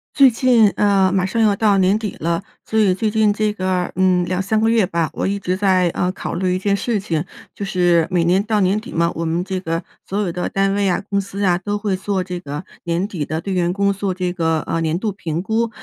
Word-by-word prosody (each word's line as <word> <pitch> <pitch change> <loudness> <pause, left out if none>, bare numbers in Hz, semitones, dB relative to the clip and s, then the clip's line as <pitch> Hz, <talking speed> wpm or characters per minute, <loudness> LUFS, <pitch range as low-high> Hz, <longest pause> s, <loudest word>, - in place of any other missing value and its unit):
最 270 -3 +7
近 230 -3 +4
呃 195 -2 +2
马 190 -1 +1
上 210 +4 -2
要 210 -2 +3
到 205 -1 +3
年 190 +2 +3
底 215 -3 -4
了， 170 +3 -1 0.2
所 220 - 0
以 195 -4 +3
最 215 +2 -1
近 220 -1 +3
这 210 0 0
个 185 -2 -1
嗯 185 -1 +2
2、3 190 +4 0
个 220 - +2
月 225 -1 +3
吧， 170 -2 -1
我 - - -2
一 200 +1 -1
直 185 -2 -2
在 185 -2 +2
呃 180 +2 -1
考 - - -6
虑 180 0 0
一 - - -2
件 200 +1 +1
事 220 +1 -1
情。 165 -6 -2 0.3
就 - - -6
是 175 -4 +2
每 180 -3 +1
年 180 +3 +3
到 215 0 0
年 195 +2 +2
底 240 - -10
嘛， 170 +1 +1
我 165 - -4
们 165 +2 -1
这 190 0 -3
个 165 -2 -3 0.2
所 200 - -2
有 195 -4 -1
的 180 +1 -3
单 195 0 +1
位 200 -1 +1
啊、 175 - 0
公 200 0 0
司 200 +1 -5
啊， 175 -2 +2
都 205 +2 -2
会 205 -2 -1
做 190 0 -2
这 180 -1 -5
个 145 -1 -6 0.2
年 170 +3 0
底 175 -8 -4
的 155 +2 -3
对 195 - -3
员 175 -1 +1
工 200 +1 +1
做 195 0 -2
这 180 -1 -2
个 165 -3 0
呃 165 - -2
年 160 0 0
度 210 +3 -2
评 165 -4 -4
估。 225 +2 0
190 Hz, 270 characters per minute, -19 LUFS, 175-205 Hz, 0.3 s, 最